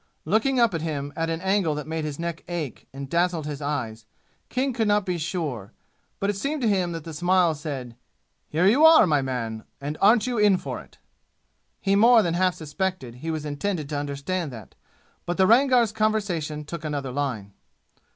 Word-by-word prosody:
Looking 225 - +2
up 235 -4 +4
at 165 - -2
him 145 -3 -4
at 165 0 -1
an 165 0 -2
angle 190 -5 +1
that 150 - -5
made 160 0 -3
his 145 -2 -4
neck 170 -1 -4
ache 170 -6 -5
and 135 +1 -7
dazzled 170 0 0
his 150 -1 -5
eyes, 115 -7 -4 0.4
King 265 +1 -1
could 225 -2 0
not 205 -1 +2
be 180 -2 -2
sure, 155 - -4 0.5
but 200 - 0
it 205 - 0
seemed 280 +7 -2
to - - +3
him 185 -4 +1
that 165 -2 -6
the 165 - -8
smile 175 +1 +3
said, 140 -6 -6 0.5
"Here 165 +4 +1
you 245 +10 +5
are, 320 -6 +8
my 150 -5 +2
man, 115 -4 -4 0.2
and 145 +2 -5
aren't 215 +2 +5
you 245 -3 -1
in 205 -3 +5
for - - -6
it?" - - -19 0.8
He 195 0 +1
more 230 +2 +6
than 170 - 0
half 180 +1 +2
suspected 155 -5 -4
he 165 - -4
was 155 -2 -3
intended 150 +1 -3
to 150 - -2
understand 145 +3 -3
that. 110 -5 -11 0.5
But 175 - -2
the 190 - +5
Rangar's 245 0 +4
conversation 195 -9 -1
took 160 +1 -7
another 145 -4 -3
line. 125 -8 -3
165 Hz, 195 wpm, -25 LUFS, 145-200 Hz, 0.8 s, are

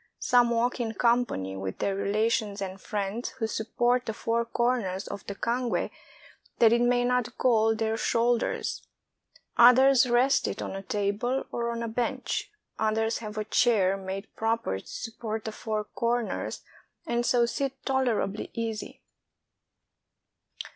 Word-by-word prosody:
Some 245 -1 +4
walk 235 +2 +1
in 225 -2 -2
company 235 - +1
with 95 0 -5
their 195 - -1
rela 205 +3 +1
tions 210 -3 -1
and 195 -1 -5
friends, 210 +3 -3
who 225 - -1
support 240 +3 0
the 220 - -3
four 230 +2 0
corners 230 -6 -1
of 200 - -6
the 200 - -4
cangue 240 +3 -1 0.7
that 230 -1 +6
it 235 - +3
may 245 0 +3
not 250 -1 0
gall 225 -3 +3
their 220 0 -1
shoulders. 235 +1 0 0.7
Others 250 +1 +7
rest 250 +3 +3
it - - -4
on - - -4
a 195 - -4
table 205 +6 -1
or 235 0 -2
on 235 0 -3
a - - -2
bench; 245 +3 -2 0.3
others 220 +1 +1
have 215 -2 -7
a 215 - -2
chair 210 -4 +3
made 195 +1 -6
proper 225 - -1
to - - -16
support 225 -1 -5
the 220 - -3
four 215 0 -3
corners, 235 +2 -2 0.4
and 235 0 0
so 240 -1 +3
sit 270 +2 -3
tolerably 245 -6 0
easy. 225 -2 -5
230 Hz, 145 wpm, -28 LUFS, 210-240 Hz, 0.7 s, Others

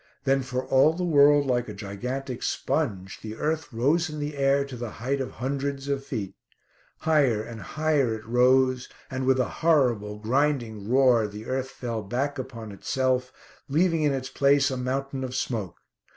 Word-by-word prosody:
Then, 135 0 +2
for 130 0 -3
all 135 +4 +4
the 180 +2 -3
world 145 -3 +5
like 120 -3 0
a 105 - -7
gigantic 125 +6 -5
sponge, 95 -1 -2
the 110 0 -6
earth 155 +4 -2
rose 145 +9 +1
in 150 0 -6
the 145 0 -3
air 140 0 +2
to 140 -2 -8
the 120 -1 -5
height 135 +4 -1
of 130 - -5
hundreds 140 +2 -3
of 140 -1 -1
feet. 110 -8 -4 0.7
Higher 140 -9 +3
and 115 -1 -8
higher 150 -6 0
it 110 - -10
rose, 130 +2 +3 0.2
and 130 0 -2
with 130 0 +4
a 125 - +2
horrible, 120 -11 +2
grinding 115 -3 0
roar 125 -4 +4
the 105 +1 -9
earth 130 +1 -2
fell 115 -4 -4
back 130 +7 -2
upon 115 -4 -7
itself, 130 +4 -1 0.4
leaving 165 +3 +2
in 150 -1 +3
its 130 -1 -3
place 140 0 +3
a - - -1
mountain 135 +1 -2
of 130 0 -4
smoke. 110 -8 -3
130 Hz, 175 wpm, -26 LUFS, 115-140 Hz, 0.7 s, world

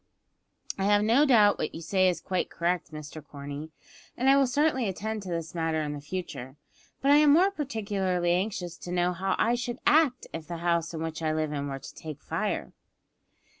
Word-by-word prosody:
"I 195 - +1
have 205 0 +4
no 245 +8 +4
doubt 215 -6 +5 0.2
you 165 - -6
say 185 +3 +2
what - - +6
is 170 -3 -2
quite 185 0 -2
correct, 170 -1 -1
Mr 150 0 -8
Corney, 145 +1 -7 0.5
and 260 +2 +4
I - - +6
will 275 -1 +4
certainly 265 -4 +1
attend 215 +3 -4
to 190 - -8
this 165 -2 -4
matter 165 -2 0
in 145 -1 -4
future; 145 -5 -6 0.5
but 275 - +4
I 290 - +8
am 300 -1 +6
more 370 +5 +5
particularly 200 - -1
anxious 180 -2 -1
to 175 - -8
know 180 0 +1
how 190 +2 -1
I 230 - +2
should 240 0 -2
act 295 -5 +4
if 160 -1 -6
the 170 - -5
house 170 0 0
in 160 - -3
which 160 0 -4
I 155 -1 0
live 155 -1 -1
were 140 -2 -3
to - - -10
take 155 -3 -8
fire." - - -2
180 Hz, 200 wpm, -28 LUFS, 160-225 Hz, 0.5 s, I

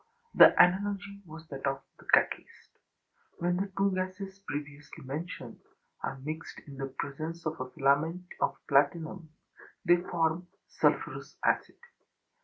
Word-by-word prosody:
The - - +9
analogy 200 +2 +3
was 160 +1 -10
that 135 -1 -4
of 135 0 -1 0.2
the - - -16
catalyst. - - +1 0.7
When 175 +1 +1
the 195 +1 -2
two 195 0 +3
gases 185 +1 -4
previously 145 -6 -7
mentioned 150 +6 -6 0.4
are 135 - -3
mixed 155 +4 -6
in 140 -2 -10
the 135 0 -3
presence 160 +4 -4
of 155 +1 -2
a 130 - -4
filament 155 +6 +2 0.2
of - - +1
platinum, 160 +4 +2 0.6
they 175 0 +6
form 170 0 0 0.2
sulphurous - - 0
acid. - - +1
160 Hz, 130 wpm, -30 LUFS, 140-185 Hz, 0.7 s, The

